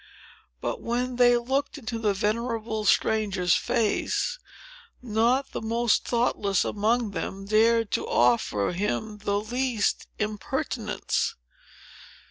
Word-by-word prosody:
But, - - -3
when 245 +1 -2
they 245 -1 +6
looked 265 +5 -1
into 235 -4 -5
the 210 -3 +1
venerable 220 +1 -1
stranger's 200 -5 +2
face, 250 - 0 0.6
not 245 +4 +1
the - - -4
most 230 0 +1
thoughtless 210 -5 +1
among 220 +1 0
them 195 0 -5
dared 225 +1 +3
to - - -1
offer 120 -4 +2
him 210 +3 -2
the 205 0 0
least 240 0 -1
impertinence. 215 -1 -2
220 Hz, 105 wpm, -26 LUFS, 205-240 Hz, 0.6 s, they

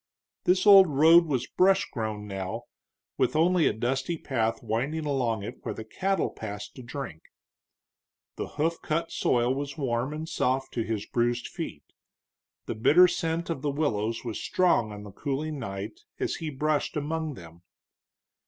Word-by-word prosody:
This 185 +2 +3
old 195 -2 +9
road 165 +4 +6
was 130 -4 0
brush 190 +5 +3
grown 110 -3 -3
now, 100 +3 -4 0.6
with - - +2
only 170 +1 +4
a - - +3
dusty 130 +8 -1
path 115 -7 -1
winding 135 +8 -1
along 120 -7 0
it - - -7
where - - -4
the 110 - -6
cattle 190 - -1
passed 105 -1 -7
to 130 - -9
drink. 120 - -6 1.1
The - - -4
hoof 165 +2 0
cut 165 +2 -1
soil 120 +1 +2
was 140 +2 -4
warm 125 -1 -1
and 155 +1 -5
soft 135 -4 -1
to 120 - -1
his 110 -2 -3
bruised 120 0 0
feet; - - -6 0.8
the - - -3
bitter 155 +11 +6
scent 165 -1 -2
of 135 - -3
the 145 - 0
willows 115 -6 -1
was 115 -3 -3
strong 145 -12 +2
on 105 0 -8
the 105 - -9
cooling 145 +6 -3
night 100 - -6 0.2
as 380 -3 -1
he 160 -2 -4
brushed 150 +2 -1
among 155 0 -2
them. 85 -3 -13
135 Hz, 160 wpm, -27 LUFS, 115-160 Hz, 1.1 s, old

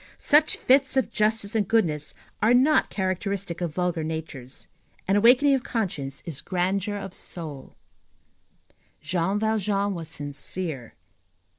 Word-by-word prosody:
Such 300 +1 +3
fits 265 0 +3
of 265 - +1
justice 215 -1 +1
and 215 -4 +1
goodness 160 -10 +1 0.3
are 230 +3 +5
not 280 +5 +4
characteristic 190 -1 -3
of 165 -3 -3
vulgar 180 -3 -1
natures. 155 -5 -6 0.4
An 195 - +3
awakening 250 +7 +6
of 265 - +2
conscience 155 - -3
is 155 -5 -5
grandeur 190 +3 -1
of 195 -2 -7
soul. 155 -6 -6 1.2
Jean 175 +5 -1
Valjean 210 -2 0
was 165 -3 -6
sincere. 145 - -4
190 Hz, 125 wpm, -25 LUFS, 160-220 Hz, 1.2 s, awakening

